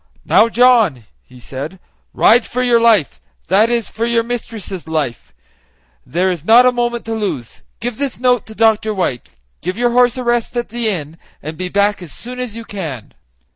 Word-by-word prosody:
"Now, 225 - +4
John," 230 - +3 0.2
he 125 -1 -17
said, 140 +9 -7 0.3
"ride 235 +1 +4
for 250 +1 -2
your 240 -2 +3
life 220 -10 +3 0.3
that 205 +5 +4
is, 235 -2 0
for 230 +1 -3
your 235 -1 +2
mistress' 225 -7 -6
life; 150 - -3 0.7
there 180 - 0
is 170 -5 -5
not 230 +6 +6
a 250 - +5
moment 240 -1 -2
to 225 - -3
lose. 200 - -4 0.2
Give 240 +1 -3
this 280 -3 -2
note 250 -1 +1
to 220 - -11
Dr. 220 -1 +2
White; 125 - -2 0.3
give 185 +4 -4
your 240 0 +1
horse 245 0 +3
a 255 - -3
rest 240 0 -1
at 240 - -2
the 235 0 -1
inn, 160 -5 -4 0.3
and 155 +2 -6
be 180 +2 -4
back 200 +1 +1
as 170 -5 -10
soon 250 +1 -9
as 250 -4 -4
you 230 0 -8
can." 160 - -7
220 Hz, 190 wpm, -17 LUFS, 180-240 Hz, 0.7 s, not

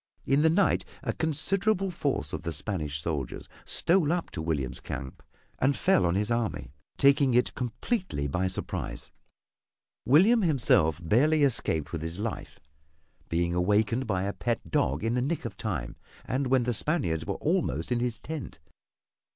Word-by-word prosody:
In 140 +2 +3
the 160 - +5
night 185 +4 +2 0.2
a - - -1
considerable 195 +5 0
force 145 -5 -2
of - - -3
the 85 0 -3
Spanish 75 -3 -1
soldiers 75 -5 -4 0.2
stole 170 -3 +3
up 175 -1 -2
to 80 - -5
William's 75 -6 -2
camp 70 -2 -7 0.4
and 135 +2 +2
fell 185 - +3
upon 85 +1 +1
his 105 +3 0
army, 115 - -2 0.3
taking 140 -2 +4
it 125 - +2
completely 125 - -2
by 90 +6 0
surprise. 95 - -4 1.0
William 195 - +6
himself 120 - +3
barely 150 - +4
escaped 80 - 0
with 85 - -4
his 80 +1 -5
life, 110 +1 -5 0.7
being 85 +1 0
awakened 105 +7 +1
by 95 -3 0
a 100 +1 -2
pet 120 -1 -3
dog 70 +7 +1
in 115 +1 0
the 125 - +1
nick 145 +2 -2
of 115 - -5
time, 85 - -4 0.3
and 130 +2 -1
when 130 -1 +3
the 120 +1 0
Spaniards 100 - 0
were - - -1
almost 80 - -1
in 120 - +2
his 120 -2 -1
tent. 155 +5 -7
115 Hz, 160 wpm, -28 LUFS, -, 1.0 s, William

